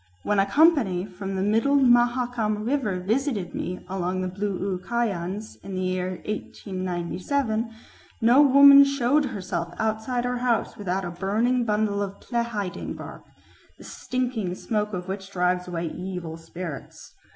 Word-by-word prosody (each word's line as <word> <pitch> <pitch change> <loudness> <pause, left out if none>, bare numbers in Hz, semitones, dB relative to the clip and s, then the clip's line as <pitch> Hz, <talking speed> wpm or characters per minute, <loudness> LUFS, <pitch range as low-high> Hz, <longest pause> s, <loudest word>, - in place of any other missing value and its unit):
When 205 -1 +1
a 195 - +3
company 235 - +3
from 195 0 -6
the 190 - 0
middle 225 +7 +2
Mahakam 240 -4 +2
River 235 -8 0
visited 220 - -1
me 180 +1 -5
among 185 0 -2
the 185 - -1
Blu 195 +1 -3
u 185 - -2
Kayans 210 -3 -3
in 195 -1 -6
the 185 - -2
year 185 0 -1
1897, 210 +5 -3 0.5
no 240 +5 +6
woman 280 0 +9
showed 275 +1 +2
herself 185 -8 -4
outside 220 +3 -1
her 245 0 -1
house 240 -3 0
without 190 -1 -2
a 175 - -4
burning 220 +8 0
bundle 210 -1 0
of 200 -1 -4
plehiding 235 -6 -3
bark, - - -9 0.5
the - - -14
stinking 245 -8 -3
smoke 210 +1 -2
of 180 -2 -5
which 195 0 -5
drives 180 -1 0
away 170 -1 -3
evil 180 -2 -6
spirits." 165 -2 -8
210 Hz, 145 wpm, -25 LUFS, 185-240 Hz, 0.5 s, woman